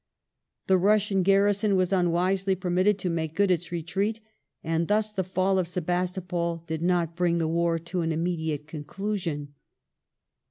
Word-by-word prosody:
The 190 -1 +4
Russian 205 0 +3
garrison 200 +2 +3
was 185 0 +1
^ - - +3
unwisely 185 +2 +1
permitted 185 +2 +1
to 185 -2 -2
make 160 -1 -3
good 200 0 +3
its 175 -1 -1
retreat, 195 +6 -2 0.4
and 165 +1 0
thus 215 +1 +1
the 195 -3 -1
fall 185 +1 +1
of 180 - -1
Sebastopol 175 -1 -2
did 160 -1 -4
not 170 -2 +1
bring 175 -1 +1
the 165 -1 0
war 170 +1 +1
to 170 +2 -4
an 165 0 0
immediate 160 -2 -2
conclusion. 155 -1 -4
180 Hz, 155 wpm, -26 LUFS, 165-195 Hz, 0.4 s, The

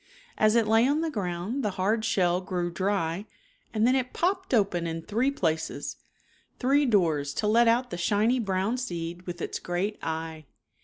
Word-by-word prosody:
As 215 +1 +3
it 230 -2 +3
lay 225 +3 +4
on 295 +3 +1
the 325 -1 -1
ground 195 +4 -3
the 210 - +1
hard 215 +4 +1
shell 180 -5 +2
grew 180 -2 -2
dry 190 0 -1 0.4
and 220 0 +1
then 255 +2 +4
it 255 -1 -1
popped 375 +2 0
open 195 -8 +2
in 165 0 -4
three 230 +8 +1
places, 160 - -2 0.6
three 275 +2 +3
doors 160 - +1
to 215 - -1
let 230 +3 +4
out 245 +1 +2
the - - -3
shiny 210 +7 +2
brown 200 +2 0
seed 175 -6 -5
with 175 0 -5
its - - -3
great 185 +4 -2
eye. 160 -2 -4
205 Hz, 175 wpm, -27 LUFS, 175-235 Hz, 0.6 s, lay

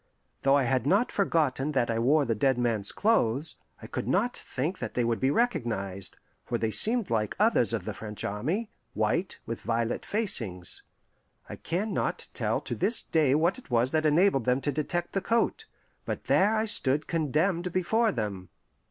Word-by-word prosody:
Though 135 +1 +4
I 140 - +2
had 130 +1 0
not 200 +9 +3
forgotten 150 -7 +1
that 120 -4 +1
I 115 - -1
wore 140 +5 +3
the 115 - +1
dead 130 +4 +2
man's 115 -4 0
clothes, 155 - +1 0.3
I - - -6
could - - -4
not 205 - +1
think 155 +9 -3
that - - -5
they 125 - +2
would 115 -1 0
be 130 - +2
recognized, 115 - -1 0.3
for 120 - -2
they 110 -1 -1
seemed 220 - +2
like 105 -2 0
others - - +3
of - - -2
the - - -3
French 105 -1 -6
army 155 - -2 0.2
white, 110 - 0
with 115 0 -5
violet 115 0 -1
facings. 115 - -2 0.7
I - - -7
can 195 +6 -3
not - - -2
tell - - -1
to - - -5
this 230 - +1
day 150 -4 +2
what 170 - +1
it - - -18
was 120 +1 +2
that 155 -1 +2
enabled 150 - +3
them 125 +1 +2
to 145 - 0
detect 160 +4 -2
the 195 - 0
coat; 230 +4 0 0.4
but - - -4
there 205 +4 +3
I 220 0 +1
stood 145 -8 +2
condemned 170 +3 0
before 220 +6 +2
them. 100 -6 -4
140 Hz, 185 wpm, -28 LUFS, 115-185 Hz, 0.7 s, Though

